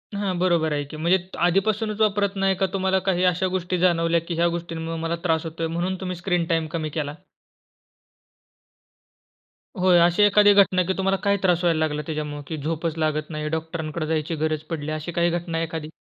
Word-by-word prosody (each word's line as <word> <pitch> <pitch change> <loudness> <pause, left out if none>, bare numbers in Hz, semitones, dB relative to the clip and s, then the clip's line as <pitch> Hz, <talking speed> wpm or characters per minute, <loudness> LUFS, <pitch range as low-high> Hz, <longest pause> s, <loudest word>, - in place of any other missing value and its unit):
हां, 200 -3 -1
बरोबर 170 -4 +2
आहे 145 0 -1
की 155 - -7
म्हणजे 170 +4 +3 0.3
आधीपासूनच 210 +3 0
वापरत 205 -1 +2
नाही 195 0 +1
का 195 - +1
तुम्हाला 190 0 +1
काही 180 -1 +1
अशा 180 +2 -1
गोष्टी 185 0 -1
जाणवल्या, 170 -1 +2
की 170 +1 -5
ह्या 170 +1 +2
गोष्टींमुळे 165 -1 -5
मला 165 +1 -1
त्रास 160 -3 +1
होतोय 165 0 -3
म्हणून 175 +3 -2
तुम्ही 185 -1 -3
स्क्रीन 175 -1 0
टाईम 165 -1 0
कमी 155 -2 -2
केला? 150 -1 -4 2.6
होय, 180 -1 +4
अशी 175 +3 +4
एखादी 205 0 +6
घटना 190 -2 +4
की 190 +2 -1
तुम्हाला 195 0 +1
काय 200 -1 +2
त्रास 180 -2 +2
व्हायला 165 -2 +2
लागला 150 -1 0
त्याच्यामुळे, 150 -2 -4
की 160 - -4
झोपच 160 +2 -2
लागत 155 -1 -1
नाही. 150 -1 -4
डॉक्टरांकडे 160 0 -3
जायची 160 +1 -1
गरज 155 0 -1
पडली 155 -3 -4
अशी 155 +2 -4
काही 170 0 +1
घटना 170 -1 -2
एखादी? 160 -1 -5
170 Hz, 185 wpm, -24 LUFS, 160-185 Hz, 2.6 s, एखादी